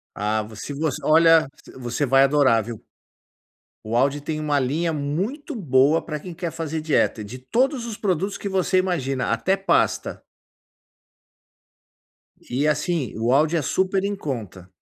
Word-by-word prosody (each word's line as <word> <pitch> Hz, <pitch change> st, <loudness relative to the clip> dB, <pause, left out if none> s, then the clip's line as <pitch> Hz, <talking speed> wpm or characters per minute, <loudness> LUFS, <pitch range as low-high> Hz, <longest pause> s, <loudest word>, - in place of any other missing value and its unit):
Ah, 105 Hz, +1 st, -1 dB
vo 110 Hz, +1 st, -11 dB
se 145 Hz, +7 st, -6 dB
você 150 Hz, -1 st, -2 dB
olha, 165 Hz, 0 st, +5 dB, 0.2 s
v -, -, -13 dB
você 125 Hz, +3 st, -2 dB
vai 135 Hz, +1 st, +5 dB
adorar, 135 Hz, -5 st, +4 dB
viu. 115 Hz, -1 st, -8 dB, 1.0 s
O 115 Hz, +2 st, -1 dB
Aldi 140 Hz, +3 st, +1 dB
tem 155 Hz, +1 st, -4 dB
uma 150 Hz, -1 st, 0 dB
linha 160 Hz, +6 st, -1 dB
muito 190 Hz, -, -3 dB
boa 150 Hz, -, +3 dB
pra 150 Hz, -2 st, -5 dB
quem 175 Hz, +4 st, -9 dB
quer 170 Hz, -1 st, -4 dB
fazer 160 Hz, -1 st, -3 dB
dieta, 155 Hz, -7 st, +1 dB
de 110 Hz, +5 st, -8 dB
todos 240 Hz, -, 0 dB
os 225 Hz, -3 st, -6 dB
produtos 195 Hz, 0 st, -1 dB
que -, -, -5 dB
você 190 Hz, -1 st, +1 dB
imagina, 135 Hz, -9 st, 0 dB
até 185 Hz, +12 st, +1 dB
pasta. 195 Hz, -, 0 dB, 2.3 s
E 135 Hz, +5 st, 0 dB
assim, 150 Hz, -, -1 dB
o 115 Hz, +2 st, 0 dB
Aldi 155 Hz, +5 st, +3 dB
é -, -, 0 dB
super 190 Hz, +6 st, 0 dB
em 200 Hz, 0 st, -1 dB
conta. 110 Hz, -, -6 dB
150 Hz, 160 wpm, -23 LUFS, 130-180 Hz, 2.3 s, olha